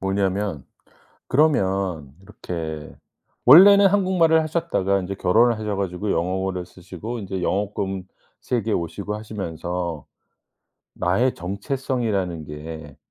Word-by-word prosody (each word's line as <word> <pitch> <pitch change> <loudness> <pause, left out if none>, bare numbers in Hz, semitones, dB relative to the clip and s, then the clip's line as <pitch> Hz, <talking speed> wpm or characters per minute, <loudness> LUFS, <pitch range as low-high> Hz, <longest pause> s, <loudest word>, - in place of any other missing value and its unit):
뭐냐면 95 -5 -1 0.6
그러면 95 - +1
이렇게 80 -6 -7 0.5
원래는 200 +9 +9
한국말을 180 -5 +3
하셨다가 155 - 0
인제 95 +1 -5
결혼을 115 +5 +3
하셔 105 -2 -3
가지고 100 +1 -3
영어를 90 +1 -2
쓰시고 95 +6 -8
인제 95 -2 -5
영어권 95 -1 -2 0.3
세계에 115 -3 -1
오시고 85 +5 -3
하시면서 90 - -5 0.9
나의 115 +9 +1
정체성이라는 100 - -2
게 75 -1 -9
95 Hz, 275 characters per minute, -23 LUFS, 90-115 Hz, 0.9 s, 원래는